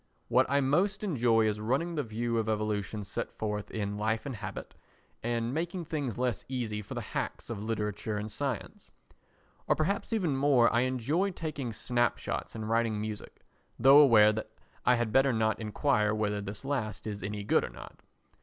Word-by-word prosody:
What - - +4
I 140 +1 +3
most 185 +10 +1
enjoy 120 - +3
is 105 -1 0
running 135 +10 0
the 155 - 0
view 115 -1 -1
of 110 0 -1
evolution 105 -1 -1
set 95 - -4
forth 105 -1 -4
in 105 -1 -3
Life 110 +3 0
and 135 -3 -4
Habit - - -7 0.5
and 120 +1 -1
making 170 +3 -2
things 145 -8 -3
less 125 -3 -1
easy 115 -5 -2
for 100 - -8
the - - -2
hacks - - -3
of 105 -3 -4
literature 105 -1 -2
and 105 +1 -4
science; 135 0 -4 0.8
or - - +4
perhaps 195 +9 -1
even 180 -11 +1
more 135 -4 +4
I 120 - +4
enjoy 145 - 0
taking 155 -8 -4
snapshots 120 +1 -1
and 110 -1 -4
writing 115 -1 +1
music, 105 -1 -6 0.4
though 135 +4 +8
aware 110 -7 +7
that 110 0 -4 0.4
I 125 - +6
had 120 -2 -1
better 135 0 +5
not 110 -1 +1
enquire 110 -1 +1
whether 105 -1 -1
this 100 +5 -6
last 115 -9 -2
is 105 -2 -4
any 105 +1 -4
good - - +3
or - - -4
not. - - -12
115 Hz, 180 wpm, -30 LUFS, 105-135 Hz, 0.8 s, though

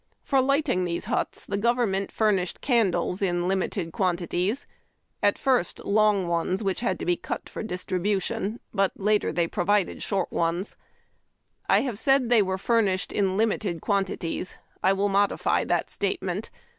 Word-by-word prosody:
For 270 - +2
ligliting 275 - +2
these 170 -1 -2
huts - - -2
the 200 - -2
government 220 -4 +1
furnished 195 -5 +1
candles 195 -7 +1
in 175 -2 0
limited 190 -2 -1
quantities: 185 +5 -1 0.6
at 205 - +3
first 255 -9 +1
long 210 -2 +3
ones, 170 +4 0
which 195 -2 -1
had 190 -6 0
to - - -5
be 175 - +2
cut - - -5
for - - -6
distribution; 195 +2 -2
but 195 -2 +2
later 210 -2 +1
they 170 +2 +1
provided 185 +3 0
short 195 -3 -1
ones. 170 +4 -1 0.9
I - - +5
have 240 -6 -3
said 270 -1 +4
that 235 - -4
they 240 -3 +6
were 190 -1 -1
furnished 200 -3 +1
in 195 -2 0
limited 210 -5 0
quantities. 190 -2 -2 0.2
I 190 - +4
will 195 +1 +1
modify 200 0 +1
that - - 0
statement. - - -2
195 Hz, 155 wpm, -26 LUFS, 180-215 Hz, 0.9 s, they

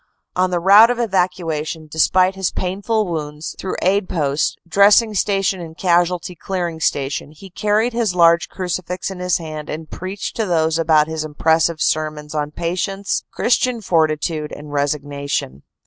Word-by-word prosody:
On 185 0 +2
the 175 -1 0
route 200 +6 +7
of 245 - 0
evacuation, 175 -7 -1
despite 185 +5 +2
his 190 -1 -1
painful 200 +4 -1
wounds, 150 -3 -5
through 190 - -3
aid 190 +1 +1
posts, 145 -3 0
Dressing 205 +5 +5
Station 195 -2 0
and 160 -1 -9
Casualty 175 0 +1
Clearing 175 -2 -4
Station, 140 -1 -1
he 190 +4 -13
car 210 +3 0
ried 230 +3 +1
his 225 -6 0
large 170 -1 +4
crucifix 180 0 -4
in 190 - -8
his 180 0 +1
hand 155 -3 -7
and 155 0 -6
preached 185 +2 -5
to 220 -2 0
those 160 -2 +1
about 160 -2 +4
him 160 0 -5
impressive 160 +1 +1
sermons 150 -1 -1
on 150 -1 -2
patience, 185 +5 -2
Christian 245 0 +1
fortitude 155 -4 0
and 145 0 -9
resignation. 140 - -2
170 Hz, 155 wpm, -19 LUFS, 155-190 Hz, -, route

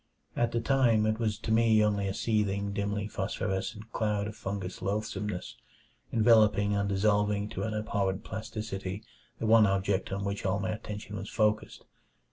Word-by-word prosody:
At 120 -1 +1
the 120 - 0
time, 115 -3 +3
it 110 +1 0
was 110 -3 0
to 110 - -4
me 110 -1 +5
only 100 -1 0
a 95 - -1
seething, 100 -2 0
dimly 100 0 -2
phosphorescent 105 +2 -3
cloud 105 -2 0
of 105 0 -6
fungous 95 -3 -5
loathsomeness, 105 -1 -3 0.5
enveloping 110 -3 +4
and 100 0 0
dissolving 105 +1 +2
to - - -5
an 110 -1 -2
abhorrent 100 -2 -1
plasticity 105 -2 -5 0.3
the - - -3
one 110 -1 +6
object 95 0 0
on 100 +1 -2
which 100 +1 -3
all 100 +1 +1
my 95 - -1
attention 105 -1 -6
was 100 +1 -6
focussed. 110 -1 0
105 Hz, 160 wpm, -30 LUFS, 100-110 Hz, 0.5 s, one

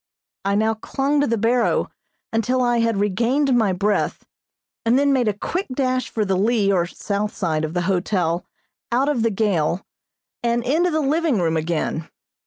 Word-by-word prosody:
I 200 0 +1
now 220 +2 +2
clung 275 +6 -1
to 290 - +2
the 230 - +1
barrow 235 +3 +1 0.4
until 250 +3 +1
I 240 -1 +2
had 230 -2 +1
regained 240 +7 +1
my 220 -5 +3
breath 205 +3 -1 0.6
and 230 +2 +3
then 280 0 +3
made 250 -4 +2
a 210 - +2
quick 365 - -3
dash 255 -2 0
for 215 -2 -1
the 190 -1 +1
lee 205 +1 +2
or 175 -2 +1
south 205 +3 -3
side 160 -6 -1
of 155 +2 -3
the 175 - 0
hotel 180 -2 0 0.5
out 260 +4 +2
of 275 -6 0
the 230 - +2
gale, 190 -5 0 0.6
and 235 0 0
into 325 +8 +2
the 315 -2 0
living 300 - +1
room 165 -2 +1
again. 160 0 -2
225 Hz, 180 wpm, -22 LUFS, 190-255 Hz, 0.6 s, my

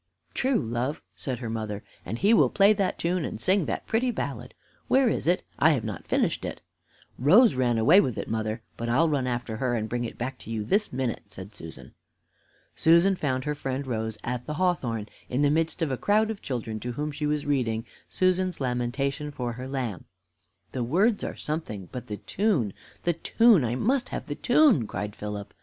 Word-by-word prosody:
"True, 260 -1 +1
love," 120 +5 -2
said 130 -3 -4
her 120 -2 -5
mother, 110 -2 -4 0.2
"and 110 +6 -4
he 205 - +4
will - - +5
play 200 +1 +5
that 195 -3 -1
tune 175 0 0
and 110 - -4
sing 185 - +2
that - - -3
pretty 240 +3 +1
ballad. 135 - -4 0.3
Where 265 0 +4
is - - -1
it? 180 +1 +2 0.2
I 160 +2 +6
have 130 - -1
not 105 -7 -6
finished - - +1
it." - - -5 0.6
"Rose 200 - +6
ran 125 -2 +1
away 155 - +6
with 125 - -2
it, - - -4
mother, 110 0 -2
but 115 0 -3
I'll 145 +8 +4
run 140 -5 0
after 120 -2 -3
her, 125 0 0
and 110 -1 -2
bring 120 +1 -2
it 115 - -6
back 130 +3 -4
to - - -11
you 110 -2 -2
this 205 - +1
minute," 125 -2 -2
said 95 +3 -10
Susan. 80 -5 -10 0.8
Susan 170 +4 +5
found 130 -6 -1
her 150 - 0
friend 135 -1 -3
Rose 110 -3 -3
at 125 0 -3
the 150 - -3
hawthorn, 130 - 0 0.2
in 130 +4 +1
the 145 - +4
midst 165 +2 +1
of 150 - -1
a 130 - -1
crowd 215 - +2
of 215 - -7
children, 115 -4 -4
to 120 +2 -4
whom 150 +4 -3
she 150 +1 -2
was 150 -1 -1
reading 120 -5 0 0.2
"Susan's 185 0 +1
Lamentation 135 +3 -1
for 125 -4 -4
her 125 +2 -7
Lamb." 125 -8 -3 0.7
"The 125 - -2
words 195 - +2
are - - -4
something, 110 - -5
but 125 -1 -7
the 105 - -4
tune 175 - 0 0.3
the 175 - +2
tune 220 - +4
I 120 0 0
must 255 - +1
have - - -4
the 145 - -4
tune," 245 - +4
cried 105 0 -4
Philip. 105 -1 -6
130 Hz, 205 wpm, -27 LUFS, 115-175 Hz, 0.8 s, I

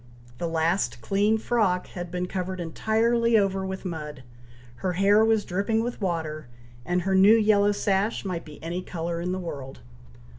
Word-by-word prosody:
The 170 - -1
last 165 -6 0
clean 200 - +1
frock 210 -6 +1
had 175 -1 -7
been 180 +1 -2
covered 185 0 -4
entirely 225 +7 +2
over 195 -2 +1
with 190 +1 -6
mud 150 -6 -6 0.5
her 185 +5 -2
hair 200 +4 +4
was 220 -1 +2
dripping 205 +5 0
with 240 -1 -5
water 160 -6 -3 0.4
and 180 +6 -1
her 195 +1 0
new 195 +4 +7
yellow 210 -2 +4
sash 200 +1 0
might 180 -3 -3
be 150 -1 -12
any 170 +2 -3
colour 170 -1 -4
in 180 +1 -2
the 185 - -2
world. 140 - -7
185 Hz, 170 wpm, -26 LUFS, 170-205 Hz, 0.5 s, new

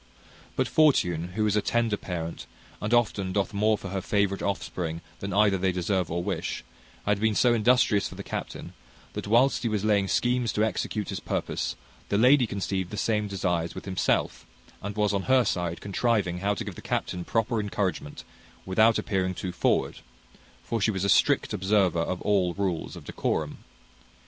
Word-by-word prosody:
But - - +1
fortune, 90 - +2
who 110 0 +1
is 105 -1 +1
a 105 - +3
tender 115 0 +1
parent, 85 -4 -5 0.3
and 105 - -2
often 105 -6 +1
doth 100 +1 0
more 105 +1 +2
for 100 - -7
her 95 0 -2
favourite 100 0 0
offspring 85 -4 -3 0.2
than 100 - -4
either 100 -1 +3
they 95 0 +2
deserve 90 0 -1
or 85 +1 -2
wish, - - -3 0.4
had 105 -1 +1
been 110 0 +1
so 120 +2 +4
industrious 115 -2 +3
for - - -10
the - - -7
captain, - - -6 0.4
that - - -5
whilst 120 +5 +4
he 115 - 0
was 105 -1 -1
laying 100 -2 +3
schemes 120 +2 +1
to 105 - +1
execute 105 0 -2
his - - -3
purpose, - - -2 0.3
the 100 - +1
lady 125 +2 +5
conceived 95 -2 -2
the 105 - -6
same 105 -1 0
desires 90 -4 -1
with - - -7
himself, 95 -2 0 0.4
and 100 0 -5
was 105 -1 +1
on 100 -1 -1
her 130 -2 +5
side 85 -2 -2
contriving 100 -3 0
how 100 +2 0
to 115 - -4
give 105 -2 -6
the - - -10
captain 90 - -2
proper 115 +4 0
encouragement, 100 -7 -3 0.4
without 110 +4 +4
appearing 95 -2 -1
too 90 - -4
forward; - - 0 0.6
for 115 -2 -2
she 105 - +3
was 95 -3 -1
a - - +1
strict - - +3
observer 95 -3 +2
of 90 +2 -3
all 95 -4 +2
rules 95 -5 -2
of - - -11
decorum. - - -2
100 Hz, 185 wpm, -27 LUFS, 95-110 Hz, 0.6 s, lady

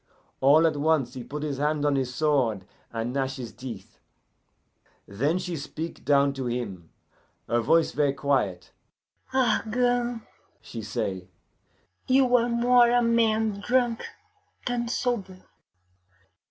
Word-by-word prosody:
All 145 +5 +5
at 155 -2 +1
once 145 -4 +1
he 130 -3 -7
put 150 +4 -6
his 140 -3 -3
hand 150 0 0
on 145 -1 +2
his 130 -2 -1
sword, 125 -9 +1 0.3
and 115 +1 -3
gnash 135 -1 -1
his 125 -4 -7
teeth. 120 -7 -9 1.1
"Then 140 - 0
she 180 -2 -4
speak 160 +2 -6
down 140 -1 +3
to 135 -2 -4
him, 100 -9 -4 0.6
her 120 - +1
voice 165 +8 +3
ver' 145 -1 +1
quiet. 130 -11 -1 0.6
'Argand,' 245 -1 +1 0.4
she 115 - -8
say, 95 -3 -4 0.8
'you 255 -1 +4
are 240 0 +3
more 240 0 +4
a 245 0 +3
man 220 -3 +2
drunk 240 +1 +1 0.6
than 240 -1 -1
sober. 205 -7 -2
150 Hz, 125 wpm, -26 LUFS, -, 1.1 s, All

